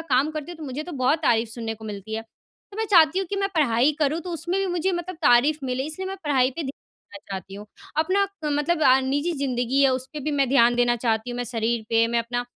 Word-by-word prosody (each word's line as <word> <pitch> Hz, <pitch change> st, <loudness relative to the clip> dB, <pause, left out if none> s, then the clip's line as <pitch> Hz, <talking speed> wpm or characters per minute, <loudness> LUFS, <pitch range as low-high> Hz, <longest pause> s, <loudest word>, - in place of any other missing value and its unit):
काम 275 Hz, +5 st, +3 dB
करती 310 Hz, +2 st, -6 dB
हूँ, 345 Hz, -, -10 dB
तो 315 Hz, -, -7 dB
मुझे 275 Hz, +2 st, -4 dB
तो 345 Hz, +2 st, -9 dB
बहुत 265 Hz, +3 st, +1 dB
तारीफ़ 230 Hz, -4 st, +2 dB
सुनने 225 Hz, -1 st, -4 dB
को 220 Hz, 0 st, -13 dB
मिलती 210 Hz, 0 st, -6 dB
है। 225 Hz, -, -3 dB, 0.5 s
तो -, -, -10 dB
मैं 445 Hz, -, 0 dB
चाहती 335 Hz, -1 st, +6 dB
हूँ 385 Hz, -, -1 dB
कि 400 Hz, +3 st, -4 dB
मैं 395 Hz, 0 st, 0 dB
पढ़ाई 270 Hz, -1 st, +3 dB
करूँ, 305 Hz, +2 st, +1 dB
तो 355 Hz, +2 st, -7 dB
उसमें 345 Hz, +3 st, -2 dB
भी 390 Hz, -, 0 dB
मुझे 355 Hz, +1 st, 0 dB
मतलब 345 Hz, 0 st, -4 dB
तारीफ़ 285 Hz, +4 st, +4 dB
मिले, 260 Hz, +1 st, -2 dB
इसलिए 315 Hz, +5 st, -4 dB
मैं 385 Hz, -, -5 dB
पढ़ाई 265 Hz, -3 st, +2 dB
पे 315 Hz, +5 st, -5 dB
ध्यान -, -, -5 dB, 0.5 s
देना 200 Hz, -, -8 dB
चाहती 195 Hz, 0 st, -6 dB
हूँ। 205 Hz, +1 st, -9 dB, 0.3 s
अपना 380 Hz, +5 st, +2 dB, 0.2 s
क 300 Hz, -, 0 dB
मतलब 310 Hz, +3 st, 0 dB
अ, 260 Hz, -1 st, +6 dB
निजी 285 Hz, +6 st, -1 dB
ज़िंदगी 265 Hz, -2 st, 0 dB
है, 275 Hz, -, +6 dB
उस 255 Hz, 0 st, -2 dB
पे 300 Hz, -, -5 dB
भी 300 Hz, +2 st, -2 dB
मैं 275 Hz, -3 st, +1 dB
ध्यान 240 Hz, -2 st, +4 dB
देना 240 Hz, 0 st, +2 dB
चाहती 230 Hz, 0 st, -1 dB
हूँ, 245 Hz, -, -5 dB
मैं 245 Hz, -, -2 dB
शरीर 230 Hz, -1 st, -1 dB
पे 230 Hz, 0 st, +3 dB
मैं 235 Hz, 0 st, +1 dB
अपना 245 Hz, +1 st, -2 dB
270 Hz, 260 wpm, -24 LUFS, 240-315 Hz, 0.5 s, चाहती